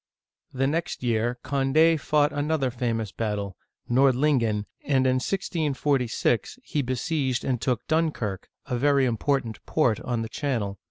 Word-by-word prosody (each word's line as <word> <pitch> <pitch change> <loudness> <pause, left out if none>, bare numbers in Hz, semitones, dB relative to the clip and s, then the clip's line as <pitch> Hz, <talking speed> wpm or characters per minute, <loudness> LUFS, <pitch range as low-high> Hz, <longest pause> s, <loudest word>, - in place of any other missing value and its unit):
The 135 +1 0
next 160 0 -2
year 120 0 0
Condd 140 +5 +3
fought 150 -1 +2
another 145 -2 0
famous 115 -4 -2
battle 105 -4 -3 0.3
(Nordlingen), 125 -4 +2 0.2
and 135 -2 +2
in 130 0 +3
1646 145 - 0
he 150 - -1
besieged 130 0 -1
and 125 -3 -1
took 125 -4 -1
Dun' 160 0 +2
kirk, 105 -8 -5 0.2
a 125 -4 -2
very 140 0 +3
important 125 -1 -1
port 120 -9 +2
on 120 -2 -2
the - - -4
Channel. 110 - -2
130 Hz, 140 wpm, -26 LUFS, 115-145 Hz, 0.3 s, Condd